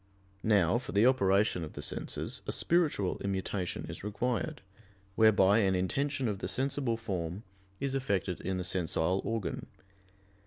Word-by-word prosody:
Now, 105 Hz, 0 st, +3 dB
for 125 Hz, -, -8 dB
the 100 Hz, +3 st, +5 dB
operation 100 Hz, -7 st, +3 dB
of 75 Hz, -, -7 dB
the -, -, -6 dB
senses, -, -, -2 dB
a -, -, 0 dB
spiritual 155 Hz, -, +1 dB
immutation 95 Hz, -1 st, -2 dB
is -, -, -8 dB
required, 105 Hz, +1 st, -2 dB, 0.5 s
whereby 105 Hz, -2 st, +5 dB
an 95 Hz, -3 st, +3 dB
intention 135 Hz, +8 st, 0 dB
of 100 Hz, -3 st, -2 dB
the -, -, -3 dB
sensible 130 Hz, -3 st, -1 dB
form 95 Hz, -3 st, -4 dB, 0.4 s
is 140 Hz, -1 st, -1 dB
effected 100 Hz, -9 st, -1 dB
in 95 Hz, 0 st, -2 dB
the 90 Hz, -, -2 dB
sensile 90 Hz, 0 st, 0 dB
organ. 110 Hz, -7 st, -3 dB
100 Hz, 145 wpm, -31 LUFS, 95-120 Hz, 0.5 s, the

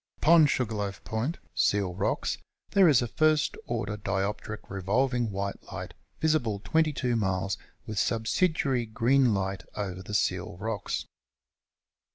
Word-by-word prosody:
Upon 160 Hz, -1 st, +6 dB
Sugarloaf 105 Hz, -7 st, -2 dB
Point 120 Hz, +9 st, -2 dB, 0.2 s
(Seal 100 Hz, -3 st, +2 dB
Rocks) -, -, -1 dB, 0.3 s
there 190 Hz, -4 st, +6 dB
is 130 Hz, -5 st, +5 dB
a -, -, -2 dB
first 155 Hz, +4 st, +2 dB
order 105 Hz, -3 st, -2 dB
dioptric 100 Hz, +1 st, -3 dB
revolving 120 Hz, +5 st, 0 dB
white 100 Hz, 0 st, -3 dB
light, -, -, -6 dB, 0.3 s
visible 140 Hz, -10 st, +1 dB
22 150 Hz, -6 st, +1 dB
miles, 95 Hz, -3 st, 0 dB, 0.3 s
with 110 Hz, -2 st, -3 dB
subsidiary 130 Hz, +1 st, +1 dB
green 125 Hz, +3 st, +3 dB
light 95 Hz, 0 st, -2 dB
over 95 Hz, -3 st, -4 dB
the 105 Hz, +3 st, -5 dB
Seal 85 Hz, -, 0 dB
Rocks. 110 Hz, +1 st, -3 dB
110 Hz, 125 wpm, -28 LUFS, 100-135 Hz, 0.3 s, Upon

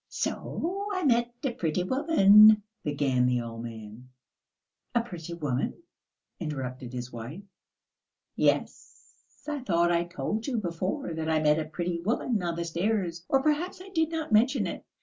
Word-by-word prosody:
"So 390 Hz, +5 st, -3 dB
I 370 Hz, -, -1 dB
met 240 Hz, -4 st, +3 dB
a 270 Hz, -, 0 dB
pretty 175 Hz, -4 st, -1 dB
woman 215 Hz, -, +6 dB
..." 225 Hz, -, -54 dB
began 135 Hz, -4 st, +1 dB
the 125 Hz, -1 st, +2 dB
old 115 Hz, -1 st, -6 dB
man. 115 Hz, +1 st, -9 dB, 0.9 s
"A 235 Hz, -, +4 dB
pretty 175 Hz, -7 st, -7 dB
woman!" 145 Hz, -, -2 dB, 0.6 s
interrupted 130 Hz, -6 st, -5 dB
his 125 Hz, 0 st, -6 dB
wife. 120 Hz, -, -7 dB, 0.9 s
"Yes.... -, -, -1 dB, 0.3 s
I 295 Hz, -1 st, -2 dB
thought 175 Hz, -8 st, +2 dB
I 170 Hz, 0 st, +2 dB
told 210 Hz, +6 st, -3 dB
you 255 Hz, -4 st, -1 dB
before 185 Hz, -, -3 dB
that 160 Hz, 0 st, -3 dB
I 160 Hz, -1 st, +3 dB
met 150 Hz, 0 st, +3 dB
a 155 Hz, -, -2 dB
pretty 170 Hz, +2 st, -3 dB
woman 220 Hz, +2 st, 0 dB
on 170 Hz, -1 st, -2 dB
the 170 Hz, 0 st, -3 dB
stairs, 170 Hz, 0 st, -1 dB
or 270 Hz, -1 st, +3 dB
perhaps 310 Hz, +5 st, 0 dB
I 375 Hz, +1 st, -11 dB
did 320 Hz, -4 st, +1 dB
not 320 Hz, -4 st, -4 dB
mention 240 Hz, +6 st, +4 dB
it? -, -, -5 dB
175 Hz, 160 wpm, -28 LUFS, 150-240 Hz, 0.9 s, woman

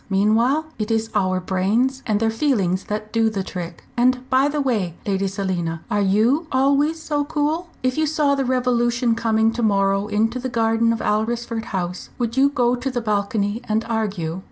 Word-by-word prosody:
Meanwhile 225 Hz, +10 st, +2 dB
it 215 Hz, +1 st, -2 dB
is 225 Hz, 0 st, 0 dB
our 185 Hz, -3 st, +1 dB
brains 210 Hz, +9 st, 0 dB
and 210 Hz, -2 st, +1 dB
their 225 Hz, 0 st, +1 dB
feelings 215 Hz, -8 st, 0 dB
that 215 Hz, +1 st, -5 dB
do 225 Hz, -1 st, +3 dB
the 200 Hz, -3 st, -3 dB
trick. 175 Hz, -3 st, -7 dB
And 250 Hz, +1 st, +2 dB
by 260 Hz, +2 st, +4 dB
the 295 Hz, +1 st, -2 dB
way, 215 Hz, -, 0 dB
Lady 195 Hz, -1 st, 0 dB
Selina, 185 Hz, -4 st, -3 dB
are 205 Hz, -, +2 dB
you 225 Hz, -, +2 dB
always 280 Hz, +4 st, +2 dB
so 300 Hz, -2 st, -1 dB
cool? 310 Hz, +4 st, -1 dB
If 255 Hz, +3 st, 0 dB
you 310 Hz, -, +2 dB
saw 295 Hz, -2 st, +2 dB
the 275 Hz, -1 st, 0 dB
Revolution 245 Hz, -1 st, +1 dB
coming 225 Hz, -1 st, +2 dB
to 240 Hz, -, -3 dB
morrow 195 Hz, -2 st, +2 dB
into 225 Hz, +4 st, 0 dB
the 255 Hz, +1 st, -3 dB
garden 230 Hz, -1 st, +2 dB
of 230 Hz, -, -2 dB
Alresford 230 Hz, +1 st, -1 dB
House, 180 Hz, -5 st, -4 dB
would 235 Hz, -2 st, -2 dB
you 275 Hz, +1 st, +4 dB
go 245 Hz, -3 st, +1 dB
to 250 Hz, +2 st, -3 dB
the 250 Hz, -2 st, -2 dB
balcony 210 Hz, 0 st, -1 dB
and 220 Hz, +1 st, 0 dB
argue?" 195 Hz, -7 st, -2 dB
225 Hz, 185 wpm, -21 LUFS, 200-255 Hz, -, by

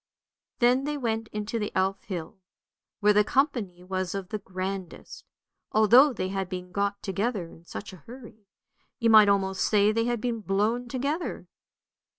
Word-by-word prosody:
Then 250 Hz, +2 st, +3 dB
they 295 Hz, 0 st, -2 dB
went 225 Hz, -4 st, -2 dB
into 210 Hz, +2 st, -4 dB
the 210 Hz, -, -3 dB
Elf 190 Hz, +1 st, 0 dB
hill, 180 Hz, -1 st, -6 dB, 0.6 s
where 210 Hz, 0 st, +5 dB
the 210 Hz, 0 st, +5 dB
company 225 Hz, -, 0 dB
was 185 Hz, 0 st, -3 dB
of 190 Hz, -2 st, -5 dB
the 215 Hz, -, -3 dB
grandest, 190 Hz, -1 st, -6 dB, 0.5 s
although 240 Hz, +7 st, +6 dB
they 190 Hz, -6 st, -3 dB
had 195 Hz, -1 st, -3 dB
been 180 Hz, -1 st, -6 dB
got 200 Hz, +1 st, -2 dB
together 200 Hz, 0 st, -2 dB
in 165 Hz, -, -17 dB
such 200 Hz, +3 st, -8 dB
a -, -, -10 dB
hurry; 225 Hz, -4 st, -12 dB, 0.5 s
you 230 Hz, -2 st, +2 dB
might 215 Hz, -2 st, +8 dB
almost 190 Hz, -1 st, +1 dB
say 210 Hz, 0 st, +3 dB
they 230 Hz, +1 st, 0 dB
had 240 Hz, -1 st, -1 dB
been 235 Hz, 0 st, -2 dB
blown 215 Hz, +5 st, 0 dB
together. 280 Hz, +7 st, -3 dB
210 Hz, 160 wpm, -27 LUFS, 190-235 Hz, 0.6 s, might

